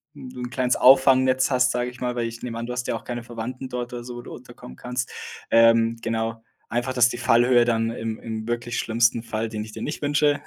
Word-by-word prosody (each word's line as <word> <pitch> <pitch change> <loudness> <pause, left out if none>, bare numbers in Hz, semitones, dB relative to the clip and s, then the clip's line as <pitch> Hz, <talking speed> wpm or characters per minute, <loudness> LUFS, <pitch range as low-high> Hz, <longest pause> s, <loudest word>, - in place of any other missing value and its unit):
d 145 - -13
'n 130 - -8
du 125 - -10
'n 125 0 -4
kleines 125 -1 0
Auffangnetz 130 0 +5
hast, 125 0 +3
sage 125 0 -2
ich 125 - -15
mal, 125 -1 -2
weil 120 -1 -1
ich 115 0 -8
nehme 115 -2 -5
an, 115 - -4
du 125 - -5
hast 125 0 -3
ja - - -1
auch - - -7
keine 120 -1 -5
Verwandten 125 +3 -6
dort 125 0 -5
oder 120 -1 -6
so, 120 0 -8
wo 120 - -7
du - - -10
unterkommen 65 - -12
kannst. 125 - -4 0.4
Ähm, 115 0 +5
genau, 115 0 -2 0.3
einfach, 120 +2 -2
dass 125 -1 +4
die 120 - -5
Fallhöhe 120 +1 +4
dann 115 -1 +1
im 115 -1 -5
im 110 -1 -6
wirklich 120 +1 -2
schlimmsten 115 0 +2
Fall, 115 -1 -3
den 105 -1 -4
ich 110 - -10
dir - - -7
nicht 150 - -4
wünsche 145 0 +2
120 Hz, 250 wpm, -24 LUFS, 115-125 Hz, 0.4 s, Auffangnetz